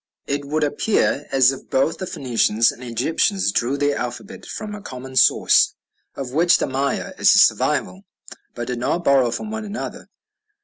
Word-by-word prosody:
It 140 0 -3
would 150 +2 -1
appear 145 -1 0
as 130 -1 +5
if 135 - -10
both 135 +5 0
the 185 - -4
Phoenicians 115 -5 +1
and 125 - -13
Egyptians 160 - 0
drew 125 +7 -1
their 145 0 0
alphabet 125 - -7
from 210 -1 -6
a 210 - -8
common 130 -4 -9
source, 130 - +4 0.4
of 135 -3 -6
which 170 +4 +4
the - - -1
Maya 135 +1 -2
is - - +5
a - - +5
survival, 190 - +2 0.5
but 120 - -4
did 125 0 -4
not 165 +8 -1
borrow 135 -5 +3
from 165 - -5
one 220 0 -4
another. 215 +1 -7
140 Hz, 175 wpm, -21 LUFS, 125-175 Hz, 0.5 s, as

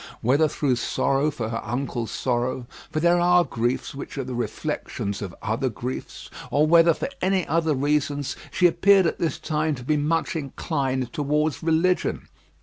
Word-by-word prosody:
Whether 140 +6 +3
through 140 -4 0
sorrow 135 +4 +1
for 120 -7 -4
her 115 - -3
uncle's 120 -1 -3
sorrow 125 +1 -1 0.2
for 155 - -2
there 175 +2 +4
are 175 0 +5
griefs 120 -3 -2
which 140 +1 -8
are 135 - -1
the 130 0 -6
reflections 100 -4 -3
of 95 -4 -6
other 115 +5 0
griefs 125 +3 -6 0.2
or 150 +2 +3
whether 165 0 +5
for - - -3
any 185 -1 +1
other 160 -2 +1
reasons, 145 0 0
she 180 - +1
appeared 190 +2 +5
at 165 - -1
this 165 -5 -1
time 155 0 -1
to 125 - -9
be 150 +4 +1
much 160 +4 0
inclined 135 -4 -2
towards 150 +1 0
religion. 165 +3 +1
145 Hz, 165 wpm, -24 LUFS, 125-160 Hz, 0.2 s, are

